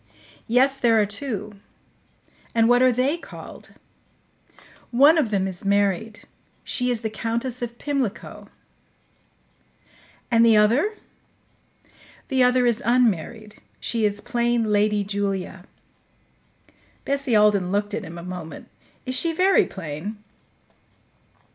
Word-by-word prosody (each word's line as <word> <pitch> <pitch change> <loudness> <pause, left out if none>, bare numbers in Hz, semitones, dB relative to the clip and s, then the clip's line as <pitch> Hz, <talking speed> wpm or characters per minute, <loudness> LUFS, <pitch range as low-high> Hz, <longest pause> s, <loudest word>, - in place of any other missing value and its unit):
"Yes, 265 +4 +3
there 230 -3 +3
are 210 - +3
two." 210 -2 -5 1.0
"And 225 0 +4
what 245 +1 +4
are 255 0 +5
they 260 +6 0
called?" - - -12 1.1
"One 280 +6 +5
of 300 -9 +1
them 195 -2 0
is 185 -2 -6
married. 200 +2 0 0.4
She 250 -1 -2
is 240 -3 -1
the 220 - -2
Countess 235 +3 -3
of 235 0 -5
Pimlico." 275 -7 -4 1.8
"And 230 -1 +5
the 225 -2 +5
other?" 255 - +3 1.3
"The 265 -2 +1
other 250 0 +4
is 235 -2 +1
unmarried; 220 -2 0 0.2
she 230 -2 -2
is 205 -1 0
plain 240 -1 0
Lady 210 -1 +1
Julia." 195 -2 -3 1.4
Bessie 275 -3 0
Alden 205 -3 +3
looked 205 +1 -1
at 220 - -3
him 170 -1 -9
a 170 - -8
moment. 180 -3 -8 0.4
"Is 255 - -3
she 330 +6 +1
very 375 +4 +3
plain?" 185 +4 -7
225 Hz, 120 wpm, -23 LUFS, 205-250 Hz, 1.8 s, are